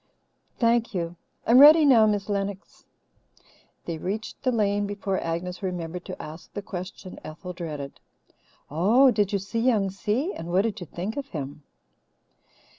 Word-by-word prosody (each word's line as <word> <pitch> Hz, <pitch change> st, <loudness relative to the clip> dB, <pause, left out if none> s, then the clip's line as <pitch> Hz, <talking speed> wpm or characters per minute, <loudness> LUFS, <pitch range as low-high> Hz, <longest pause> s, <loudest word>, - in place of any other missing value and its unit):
Thank 230 Hz, -2 st, +2 dB
you. 170 Hz, -1 st, -2 dB, 0.3 s
I'm 240 Hz, +3 st, +6 dB
ready 305 Hz, +2 st, +9 dB
now, 235 Hz, -6 st, +6 dB
Miss 205 Hz, -2 st, 0 dB
Lennox." 200 Hz, -1 st, -4 dB, 1.0 s
They 165 Hz, -2 st, -4 dB
reached 210 Hz, +6 st, -4 dB
the 255 Hz, -, +1 dB
lane 205 Hz, -3 st, +1 dB
before 200 Hz, -1 st, -2 dB
Agnes 175 Hz, +2 st, -4 dB
remembered 180 Hz, -2 st, -4 dB
to -, -, -7 dB
ask 155 Hz, +2 st, -9 dB
the 205 Hz, -, -5 dB
question 185 Hz, -1 st, -7 dB
Ethel 170 Hz, +4 st, -8 dB
dreaded. 150 Hz, -6 st, -6 dB, 0.7 s
"Oh, 225 Hz, -, +5 dB
did 205 Hz, -4 st, +1 dB
you 200 Hz, -, +2 dB
see 200 Hz, +4 st, -4 dB
Young 220 Hz, -5 st, +2 dB
Si? 220 Hz, -, -1 dB
And 165 Hz, -, -7 dB
what 185 Hz, +3 st, +3 dB
do 225 Hz, -1 st, 0 dB
you 180 Hz, -6 st, -8 dB
think 185 Hz, -, -5 dB
of 280 Hz, -1 st, -4 dB
him?" 145 Hz, -, -6 dB
200 Hz, 155 wpm, -26 LUFS, 175-225 Hz, 1.0 s, ready